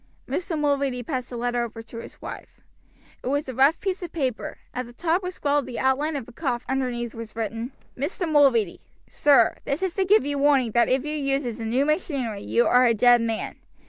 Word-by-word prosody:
Mr. 340 -3 -2
Mulready 280 -4 0
passed 255 -1 -4
the 245 - -6
letter 245 0 0
over 225 -1 -7
to 225 +1 -11
his - - -11
wife. - - -9 0.6
It - - -5
was 285 +2 0
a 260 - -4
rough 275 +6 +4
piece 385 -1 -2
of 350 -2 -6
paper; 265 -8 -3 0.2
at 250 -1 -4
the 240 - -13
top 335 +6 0
was 365 -1 -5
scrawled 285 -2 0
the 245 - -6
outline 280 +4 +1
of 270 -5 -4
a - - -11
coffin 250 -2 -2
underneath 245 -3 -1
which - - -10
was 230 -1 -8
written: 225 +2 -3 0.2
"MR. 325 +6 -2
MULREADY: 260 - +3 0.2
Sir, 275 -6 +4
this 280 +6 -2
is 375 -3 0
to 390 - +1
give 410 0 +4
you 285 0 -1
warning 275 -5 +3
that 235 +2 +3
if 260 +2 +1
you 300 0 -2
uses 275 -5 -1
the 225 - -4
new 250 +5 +1
machinery 275 - -1
you 235 - +2
are 250 0 +5
a 230 - +3
dead 240 +2 +6
man. 225 -1 -3
260 Hz, 220 wpm, -25 LUFS, 240-295 Hz, 0.6 s, dead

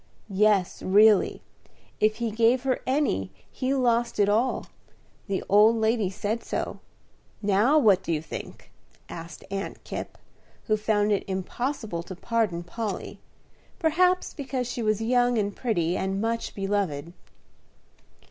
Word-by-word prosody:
"Yes, 200 -2 +2
really. 210 +2 +4 0.6
If 215 0 +3
he 230 0 -2
gave 235 +3 +3
her 260 -1 0
any 260 - +1 0.2
he 265 +1 -1
lost 240 -2 +1
it 205 -1 +4
all; 225 +5 +1 0.6
the 195 -2 -2
old 210 +3 +6
lady 220 -3 +1
said 210 +4 -3
so. - - -3 0.6
Now 210 +9 +4
what 210 -10 +5
do - - -4
you 155 - +1
think?" 155 - -9 0.4
asked 165 -2 -9
Aunt 195 0 -5
Kipp, - - -6 0.5
who 215 - +1
found 210 -1 +1
it 200 - +1
impossible 200 +1 -3
to 185 +2 -9
pardon 200 -4 -1
Polly, 210 +3 -5 0.6
perhaps 360 +2 +2
because 265 -3 -3
she 245 - -4
was 215 0 0
young, 245 +1 +2
and 205 -2 -1
pretty, 175 -8 0
and 195 +1 -1
much 230 +2 -2
beloved. 195 -6 -2
215 Hz, 135 wpm, -26 LUFS, 195-240 Hz, 0.6 s, old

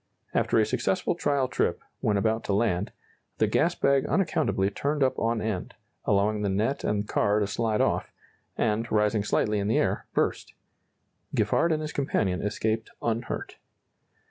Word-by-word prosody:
After - - +2
a 110 - +5
successful 185 - 0
trial 140 -6 +1
trip, - - 0 0.2
when 105 -1 +1
about 110 +2 +1
to 100 - 0
land, 100 -2 +1 0.5
the - - +3
gas - - +2
bag 140 -1 +3
unaccountably 105 - +1
turned 145 +6 0
up 130 - +1
on 115 -1 0
end, 105 -5 -3 0.3
allowing 105 +1 +2
the 100 - 0
net 110 +8 0
and 105 0 0
car 105 0 +2
to 105 - +1
slide 110 +1 0
off, - - 0 0.5
and, 115 +1 0
rising 105 0 +2
slightly 105 0 +1
in 100 - -1
the 110 - +2
air, - - 0
burst. - - -1 0.8
Giffard 170 - +2
and 155 -1 0
his 150 - -5
companion 100 -9 0
escaped 110 +2 -1
unhurt. 115 +1 -3
110 Hz, 160 wpm, -27 LUFS, 105-130 Hz, 0.8 s, a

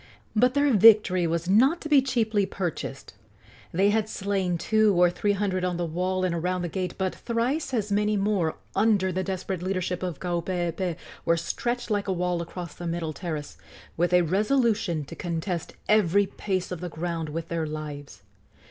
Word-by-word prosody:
But 250 +4 +3
their 285 -1 +3
victory 205 -4 +6
was 170 +1 -1
not 260 - +4
to - - -5
be 290 -3 +6
cheaply 220 -6 +1
purchased. 180 -4 -5 0.6
They 195 +4 +3
had 215 0 0
slain 190 -4 -1
two 215 +2 +3
or 180 -1 +5
three 205 +4 0
hundred 190 -2 -1
on 180 -1 -1
the 175 - -1
wall 185 +3 -1
and 180 -2 +1
around 180 +2 -1
the 175 - -2
gate, 180 +1 -3
but 190 -1 -1
thrice 250 +6 -1
as 215 -5 -1
many 210 +1 +2
more, 195 -5 +1 0.2
under 200 -2 +3
the 185 +1 -1
desperate 190 -1 -3
leadership 185 -1 -2
of 180 -5 -4
Kaupeepee, 175 0 -2 0.3
were 170 0 +2
stretched 240 +8 -3
like 205 -1 0
a 190 - +1
wall 180 -1 -1
across 170 -1 -7
the 175 - -7
middle 165 -2 -2
terrace, 155 -2 -6 0.4
with 175 +2 +1
a 180 0 +5
resolution 205 - +1
to - - -9
contest 170 0 -3
every 205 -2 +4
pace 190 -2 -3
of 180 - -4
the 180 - -4
ground 165 -1 -3
with 165 +2 -5
their 165 -2 -1
lives. 145 -6 -7
185 Hz, 180 wpm, -26 LUFS, 170-210 Hz, 0.6 s, victory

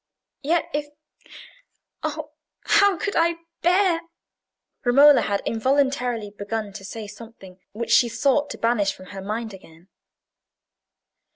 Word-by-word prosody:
"Yet 330 +4 +1
if—oh, 305 +1 -9 0.3
how 405 -2 +4
could 400 +6 -2
I 335 +1 +3 0.3
bear—" 355 -1 +3 0.8
Romola 280 +3 +6
had 200 -1 -1
involuntarily 250 -2 0
begun 205 0 -5
to 200 -1 -9
say 215 +3 -7
something 210 -3 -13
which 230 +2 -4
she 240 - +5
sought 275 +5 +1
to - - -6
banish 230 -4 +1
from 185 - -13
her 195 - -6
mind 215 +2 -4
again. 175 -1 -16
245 Hz, 115 wpm, -23 LUFS, 210-300 Hz, 0.8 s, Romola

